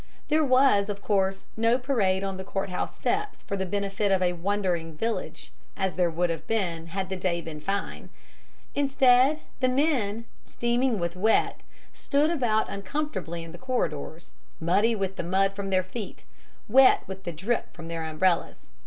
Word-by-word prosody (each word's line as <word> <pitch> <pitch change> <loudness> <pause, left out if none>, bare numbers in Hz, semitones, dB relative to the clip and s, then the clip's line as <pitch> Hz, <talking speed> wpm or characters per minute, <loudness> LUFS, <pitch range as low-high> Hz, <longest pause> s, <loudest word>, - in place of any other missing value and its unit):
There 310 +1 +3
was, 255 -7 +4
of 200 -1 -3
course, 195 -2 0
no 230 +2 +3
parade 210 -8 +1
on 195 -1 -3
the 190 - -5
courthouse 190 -1 -3
steps 420 +2 -2
for 200 - -3
the 190 -1 -2
benefit 200 +1 -1
of 190 - +4
a 180 0 +2
wondering 175 -2 -1
village, 225 +4 -3 0.3
as 190 -2 0
there 180 -2 +2
would 170 +1 0
have 165 - -5
been 175 -7 -1
had 190 +2 -4
the 190 - -2
day 180 -2 -1
been 160 -2 -7
fine. 200 +5 -3 0.6
Instead, 270 +1 +4 0.2
the 255 -1 +3
men, 255 -6 +1 0.2
steaming 240 0 0
with 170 -1 -2
wet, 215 +5 +2 0.3
stood 295 +3 +1
about 235 -9 +1
uncomfortably 195 - -4
in 165 - -9
the 175 - -11
corridors, 165 - -3 0.3
muddy 200 +8 +2
with 195 -1 -3
the - - -2
mud 195 +3 +2
from 195 0 -4
their 185 -1 +2
feet, 195 +3 -7 0.4
wet 260 +4 +6
with 190 0 -8
the 175 - -4
drip 195 +9 -2
from 165 -1 -9
their 165 -1 -4
umbrellas. 160 - 0
195 Hz, 170 wpm, -27 LUFS, 180-235 Hz, 0.6 s, wet